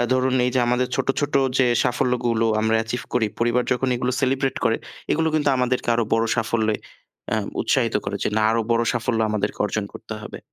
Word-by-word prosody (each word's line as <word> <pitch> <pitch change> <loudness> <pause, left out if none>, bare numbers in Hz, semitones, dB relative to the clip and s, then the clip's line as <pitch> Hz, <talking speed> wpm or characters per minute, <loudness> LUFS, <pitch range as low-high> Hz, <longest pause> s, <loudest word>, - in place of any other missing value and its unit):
আ - - +3
ধরুন 130 0 +2
এই 125 - +1
যে 130 - +3
আমাদের 125 +1 +1
ছোট, - - -1
ছোট 145 0 -2 0.2
যে 130 - +5 0.2
সাফল্যগুলো 120 -2 +1
আমরা 110 +1 +2
achieve 120 +2 -4
করি 115 -3 +2
পরিবার 120 +1 +2
যখন 130 +1 0
এগুলো 125 +1 -1
সেলিব্রেট 135 0 0
করে 115 0 +3 0.4
এগুলো 160 +1 +1
কিন্তু 150 -2 +2
আমাদেরকে 125 0 0
আরো 115 -1 +1
বড় 115 0 +2
সাফল্যে 110 -1 +1 0.6
আ - - +1 0.2
উৎসাহিত - - +1
করে - - -2 0.2
না 110 - +1
আরো 115 +1 +2
বড় 115 0 +2
সাফল্য 115 -1 -1
আমাদেরকে 105 -1 -2
অর্জন 105 0 -2
করতে - - -8
হবে। - - -8
120 Hz, 195 wpm, -23 LUFS, 115-125 Hz, 0.6 s, যে